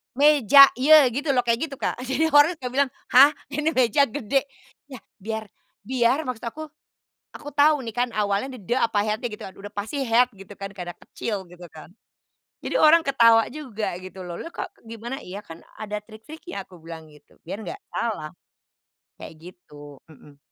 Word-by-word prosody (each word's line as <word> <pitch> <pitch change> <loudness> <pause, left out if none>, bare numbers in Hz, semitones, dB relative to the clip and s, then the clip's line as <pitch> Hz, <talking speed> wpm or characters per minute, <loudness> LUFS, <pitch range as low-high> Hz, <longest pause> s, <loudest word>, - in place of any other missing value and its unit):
"meja 280 -1 +7
je," 290 +5 +6 0.2
gitu 280 +6 -4
loh, 250 - +3
kayak 235 +5 0
gitu, 285 - -9
Kak. 265 - -3
Jadi 315 +5 0
orang 290 +4 +5
suka 265 -6 -6
bilang, 275 +1 +1 0.2
"Hah, 275 +4 +7 0.2
ini 305 +2 -1
meja 255 +3 +3
gede?" 275 +2 -1 0.4
Yah 260 -4 -11 0.2
biar 220 +2 -5 0.4
biar 255 +4 +1
maksud 250 -4 -6
aku, 300 +7 -6 0.7
aku 290 - -9
tahu 295 +1 +4
nih 225 - -6
kan 245 +1 +1
awalnya 205 +3 0
d - - -7
"de", 195 - -1
apa, 220 -4 +1
"het-nya", 215 +3 -2
gitu - - -12
aduh. 190 - -10
Udah 205 - -10
pasti 210 +8 -4
"het" 245 +2 +3
gitu 195 +1 -12
kan, 195 0 -7
karena 180 -3 -8
kecil 205 -4 -6
gitu 180 0 -12
kan. 155 0 -14 0.7
Jadi - - -4
orang 325 +2 +6
ketawa 230 -6 +4
juga, 220 -10 -5
gitu 185 0 -10
loh. 175 -1 -7
"Loh - - -7
loh - - -11
kok - - -5 0.2
gimana? 230 +4 -7
Iya 200 -1 -9
kan 165 -4 -12 0.2
ada 210 -1 -5
trik-triknya," 220 - -10
aku 180 -2 -17
bilang 160 -1 -11
gitu. 150 -1 -21
Biar 185 +5 -6
nggak - - -7
salah, 200 -10 -3 0.9
kayak - - -10 0.2
gitu, 145 -5 -15
hmm. 145 -2 -18
230 Hz, 185 wpm, -24 LUFS, 195-275 Hz, 0.9 s, meja